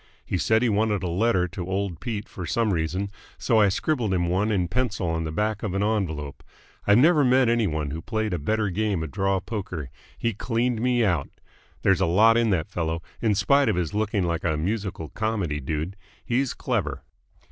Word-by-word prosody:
He 90 Hz, -, -1 dB
said 110 Hz, +5 st, +3 dB
he -, -, +3 dB
wanted 105 Hz, -1 st, +1 dB
a -, -, -1 dB
letter 90 Hz, +1 st, +2 dB
to 90 Hz, +1 st, -6 dB
old 95 Hz, -3 st, -2 dB
Pete 110 Hz, -4 st, -4 dB
for 90 Hz, -3 st, -7 dB
some 115 Hz, -4 st, +1 dB
reason, 90 Hz, +4 st, -1 dB, 0.3 s
so 115 Hz, -, +2 dB
I 105 Hz, -2 st, +5 dB
scribbled 115 Hz, -2 st, 0 dB
him 85 Hz, -1 st, 0 dB
one 100 Hz, +5 st, +1 dB
in 90 Hz, -4 st, +1 dB
pencil 110 Hz, -3 st, -1 dB
on 80 Hz, 0 st, -1 dB
the 80 Hz, -, -3 dB
back 105 Hz, +5 st, -1 dB
of 100 Hz, -4 st, -3 dB
an 100 Hz, -, +1 dB
envelope. 80 Hz, -10 st, -2 dB, 0.4 s
I've 105 Hz, +1 st, +6 dB
never 150 Hz, +3 st, +5 dB
met 130 Hz, 0 st, +4 dB
any 115 Hz, -2 st, +2 dB
one 75 Hz, -3 st, -2 dB
who 80 Hz, +3 st, -4 dB
played 110 Hz, -1 st, -2 dB
a 90 Hz, -, -1 dB
better 105 Hz, +6 st, 0 dB
game 100 Hz, -3 st, 0 dB
of 80 Hz, -, -6 dB
draw 95 Hz, -1 st, +1 dB
poker. 95 Hz, -, -5 dB, 0.3 s
He 115 Hz, -1 st, -1 dB
cleaned 115 Hz, +2 st, -1 dB
me 120 Hz, -1 st, +2 dB
out. 85 Hz, -8 st, 0 dB, 0.5 s
There's 95 Hz, -1 st, +3 dB
a 95 Hz, -, +3 dB
lot 110 Hz, +7 st, +5 dB
in 115 Hz, -1 st, +3 dB
that 85 Hz, -6 st, 0 dB
fellow, 80 Hz, -1 st, -2 dB, 0.2 s
in 110 Hz, -3 st, +2 dB
spite 140 Hz, +7 st, +3 dB
of -, -, +1 dB
his 85 Hz, -3 st, -2 dB
looking 105 Hz, -2 st, 0 dB
like 85 Hz, -1 st, -1 dB
a 80 Hz, -3 st, +1 dB
musical 95 Hz, -1 st, -3 dB
comedy 105 Hz, -9 st, -2 dB
dude. 80 Hz, +6 st, -3 dB, 0.3 s
He's 125 Hz, +2 st, 0 dB
clever." -, -, -2 dB
100 Hz, 205 wpm, -25 LUFS, 85-110 Hz, 0.5 s, I've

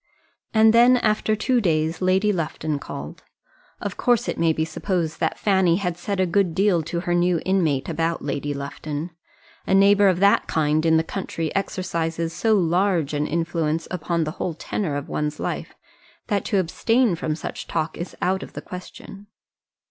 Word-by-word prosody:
And 220 Hz, 0 st, +5 dB
then 240 Hz, +2 st, +6 dB
after 215 Hz, -1 st, +1 dB
two 245 Hz, +3 st, +1 dB
days 160 Hz, -3 st, 0 dB
Lady 190 Hz, +3 st, +2 dB
Lufton 155 Hz, -3 st, -2 dB
called; -, -, -8 dB, 0.6 s
of -, -, -5 dB
course 245 Hz, -3 st, +2 dB
it -, -, -3 dB
may 165 Hz, -1 st, +3 dB
be 160 Hz, 0 st, 0 dB
supposed 170 Hz, -2 st, -2 dB
that -, -, 0 dB
Fanny 190 Hz, -4 st, +3 dB
had 180 Hz, -2 st, -2 dB
said 190 Hz, +3 st, -4 dB
a 185 Hz, -, +3 dB
good 180 Hz, -1 st, +1 dB
deal 195 Hz, -3 st, +3 dB
to 170 Hz, +2 st, -3 dB
her 175 Hz, -1 st, -1 dB
new 175 Hz, -1 st, +2 dB
inmate 165 Hz, -8 st, +1 dB
about 165 Hz, 0 st, -1 dB
Lady 145 Hz, +1 st, -2 dB
Lufton. 145 Hz, +3 st, -5 dB, 0.6 s
A 190 Hz, -, +3 dB
neighbour 200 Hz, +1 st, +6 dB
of 185 Hz, -2 st, +2 dB
that 200 Hz, +1 st, +4 dB
kind 155 Hz, +1 st, +1 dB
in 160 Hz, 0 st, +5 dB
the 160 Hz, -, +2 dB
country 165 Hz, -2 st, -4 dB
exercises 170 Hz, -4 st, -2 dB
so 220 Hz, +3 st, +2 dB
large 175 Hz, -4 st, +1 dB
an 150 Hz, 0 st, 0 dB
influence 165 Hz, -1 st, -1 dB
upon 170 Hz, -1 st, -1 dB
the 155 Hz, -, -3 dB
whole 170 Hz, 0 st, -4 dB
tenor 165 Hz, -1 st, -3 dB
of 145 Hz, 0 st, -4 dB
one's 150 Hz, 0 st, -3 dB
life, -, -, -4 dB, 0.5 s
that 205 Hz, -3 st, +1 dB
to 205 Hz, -, 0 dB
abstain 225 Hz, +5 st, +2 dB
from 160 Hz, -2 st, -2 dB
such 155 Hz, -, -6 dB
talk 155 Hz, 0 st, -2 dB
is 175 Hz, +1 st, -6 dB
out 190 Hz, +2 st, +1 dB
of -, -, -9 dB
the -, -, -6 dB
question. 195 Hz, +2 st, -10 dB
175 Hz, 180 wpm, -23 LUFS, 160-195 Hz, 0.6 s, then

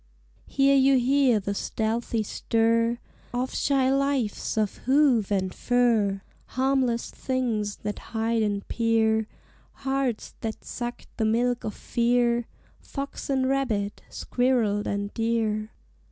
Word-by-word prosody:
Here 275 Hz, 0 st, +3 dB
you 270 Hz, 0 st, +5 dB
hear 255 Hz, -2 st, +3 dB
the 200 Hz, 0 st, -3 dB
stealthy 225 Hz, +2 st, -1 dB
stir 230 Hz, +2 st, +1 dB, 0.4 s
Of 255 Hz, +1 st, -1 dB
shy 270 Hz, -2 st, +2 dB
lives 275 Hz, -7 st, 0 dB
of 215 Hz, -2 st, 0 dB
hoof 265 Hz, -7 st, +4 dB
and 190 Hz, -2 st, 0 dB
fur; 225 Hz, -6 st, +1 dB, 0.2 s
Harmless 260 Hz, -3 st, 0 dB
things 230 Hz, -6 st, -2 dB
that 210 Hz, 0 st, -3 dB
hide 225 Hz, 0 st, -1 dB
and 205 Hz, -2 st, -1 dB
peer, 220 Hz, -1 st, +2 dB, 0.6 s
Hearts 270 Hz, -4 st, -1 dB
that 220 Hz, -1 st, -4 dB
sucked 240 Hz, 0 st, -6 dB
the 220 Hz, -, +1 dB
milk 240 Hz, +2 st, +1 dB
of 215 Hz, -, -4 dB
fear 240 Hz, 0 st, +1 dB, 0.3 s
Fox 280 Hz, 0 st, -6 dB
and 265 Hz, -1 st, +1 dB
rabbit, 235 Hz, -7 st, -1 dB
squirrel 235 Hz, -5 st, 0 dB
and 200 Hz, 0 st, -2 dB
deer. 225 Hz, -2 st, 0 dB
235 Hz, 120 wpm, -26 LUFS, 215-260 Hz, 0.6 s, you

